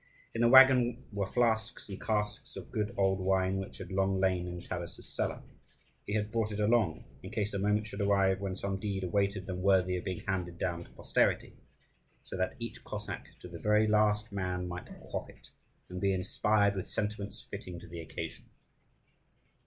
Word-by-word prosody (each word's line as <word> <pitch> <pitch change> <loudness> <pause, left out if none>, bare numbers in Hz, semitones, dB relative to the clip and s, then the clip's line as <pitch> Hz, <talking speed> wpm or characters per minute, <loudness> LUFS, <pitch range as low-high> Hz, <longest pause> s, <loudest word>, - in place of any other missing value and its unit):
In 115 - -1
the 120 - +6
waggon 130 -1 +7
were 100 -1 -1
flasks 110 -1 0
and 95 -2 -7
casks 105 -1 -2
of - - -8
good 105 +1 -1
old 95 -1 +3
wine, 95 0 +2
which 95 - -6
had 95 -2 -8
long 95 0 +1
lain 95 -2 +2
in 90 0 -5
Taras's 85 0 -6
cellar. - - -2 0.6
He 105 - -2
had 105 0 -1
brought 110 -1 0
it 105 - -4
along, 105 -6 +2 0.2
in - - -8
case 105 0 -2
a 100 - -1
moment 105 +2 +2
should 105 0 -5
arrive 100 -1 +3
when 95 -2 -2
some 95 0 -2
deed 100 -2 -2
awaited 100 +1 0
them 90 -1 -4
worthy 95 -1 +4
of 90 - -5
being 95 -3 -3
handed 90 -3 -2
down 85 -1 -2
to - - -18
posterity, - - +1 0.7
so - - -7
that 95 0 -1
each 115 -1 -6
Cossack, - - -6
to - - -8
the 85 -1 -8
very 105 0 +4
last 105 0 +3
man, 90 -2 -2
might 90 0 -6
quaff - - -5
it, - - -16 0.4
and 90 0 -6
be 100 -1 +3
inspired 100 +2 +2
with 95 -2 -4
sentiments 105 0 -3
fitting 90 -3 -6
to - - -12
the 85 0 -7
occasion. 80 - -6
100 Hz, 190 wpm, -32 LUFS, 95-105 Hz, 0.7 s, waggon